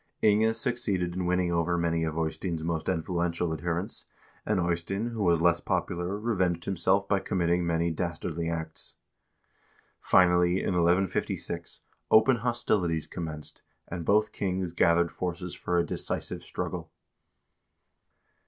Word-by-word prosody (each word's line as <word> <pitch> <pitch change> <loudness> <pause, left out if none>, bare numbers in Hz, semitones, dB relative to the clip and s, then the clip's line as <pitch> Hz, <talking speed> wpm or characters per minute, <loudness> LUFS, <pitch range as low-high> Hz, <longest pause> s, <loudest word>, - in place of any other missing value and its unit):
Inge 110 +1 +4
succeeded 105 -8 0
in 90 -1 -1
winning 90 -1 +1
over 85 +1 +1
many 85 -1 +1
of 80 0 -3
Eystein's 80 +1 -2
most 80 0 -2
influential 85 -1 -1
adherents, 85 +6 -3 0.4
and 105 -3 +2
Eystein, 90 +6 -1
who 115 -2 -4
was 85 -4 +3
less 85 0 +4
popular, 90 +4 -2
revenged 95 -6 0
himself 95 +1 +1
by 100 -1 +2
committing 85 -2 0
many 85 0 +1
dastardly 85 0 -3
acts. 80 -1 -5 1.0
Finally, 90 -1 +4
in - - -1
1156, 85 -1 0 0.3
open 120 +3 +6
hostilities 105 -9 0
commenced, 80 -3 -7 0.3
and 85 -1 -5
both 105 +3 +3
kings 95 -4 -2
gathered 85 0 +3
forces 90 0 -4
for 90 - -1
a 85 - +3
decisive - - -3
struggle. - - -5
85 Hz, 125 wpm, -28 LUFS, 85-95 Hz, 1.0 s, open